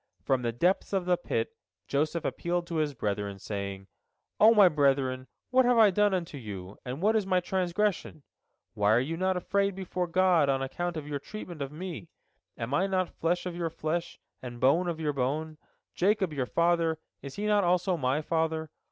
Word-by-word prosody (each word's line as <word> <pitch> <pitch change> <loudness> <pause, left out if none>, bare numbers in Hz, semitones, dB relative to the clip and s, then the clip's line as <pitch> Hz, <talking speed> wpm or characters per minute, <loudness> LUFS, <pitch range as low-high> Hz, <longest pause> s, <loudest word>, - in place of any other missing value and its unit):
From 130 -2 +1
the 120 -1 -1
depths 175 - +1
of 190 -2 0
the 180 0 +3
pit 115 -9 -2 0.4
Joseph 155 +3 -1
appealed 175 0 -1
to 170 -1 -4
his 150 -3 0
brethren, 100 -2 -2
saying: 100 -1 -5 0.5
"O 220 +2 +8
my 210 -4 +7
brethren, 135 -4 +1 0.2
what 260 0 +5
have 245 -1 +3
I 215 -3 +7
done 205 +2 +3
unto 170 -6 -3
you, 100 -4 -8
and 130 +7 -5
what 215 +2 +3
is 210 -3 +1
my 185 -1 +3
transgression? 185 -2 -1 0.5
Why 105 +1 +3
are 115 - +5
you 145 +6 -2
not 185 +1 0
afraid 200 +2 0
before 180 -1 -3
God 175 -4 +3
on 135 -1 +2
account 175 +5 -3
of 150 -2 -6
your 145 -1 -3
treatment 175 -2 -8
of 135 0 -3
me? 170 +1 -7 0.5
Am 120 +3 -4
I 185 +7 +2
not 185 -2 0
flesh 175 +2 -1
of 180 -1 -4
your 170 -1 -2
flesh, 165 +2 -3 0.2
and 120 -1 -8
bone 160 +8 +3
of 165 -2 -3
your 150 -2 -1
bone? 150 +4 -2 0.3
Jacob 190 -3 +1
your 130 -4 -2
father, 170 0 +2 0.2
is 140 -1 -8
he 205 - -3
not 210 -1 +3
also 180 +1 +2
my 140 0 0
father? 160 -1 -1
165 Hz, 195 wpm, -29 LUFS, 135-185 Hz, 0.5 s, O